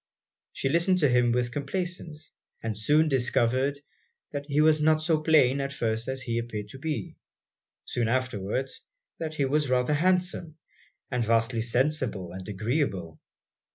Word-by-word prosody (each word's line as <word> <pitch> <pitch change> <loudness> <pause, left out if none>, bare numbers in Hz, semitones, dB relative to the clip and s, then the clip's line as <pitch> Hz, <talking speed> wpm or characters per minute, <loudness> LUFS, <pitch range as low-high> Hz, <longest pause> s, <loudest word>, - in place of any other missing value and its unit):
She - - -2
listened 170 +6 +3
to 145 - +4
him 125 -1 +3
with 120 0 0
complaisance; 160 +2 -4 0.3
and 110 -2 -2
soon 150 +9 +3
discovered 130 0 +1 0.5
'that 145 -1 -5
he 145 0 +1
was 155 0 +5
not 155 0 +4
so 155 0 +1
plain 140 -4 +4
as - - -1
at - - -10
first 115 +1 -1
he 115 -2 -1
appeared 110 -3 -5
to 135 - -10
be' 160 +2 -4 0.7
soon 120 -2 -1
afterwards, 130 0 -2 0.4
'that 155 -1 -4
he 140 - +1
was 145 +1 +1
rather 125 +3 +2
handsome, 175 -1 0 0.5
and 125 -2 0
vastly 115 +1 +1
sensible 120 - 0
and 95 +2 -8
agreeable.' 105 - -2
135 Hz, 150 wpm, -27 LUFS, 115-155 Hz, 0.7 s, was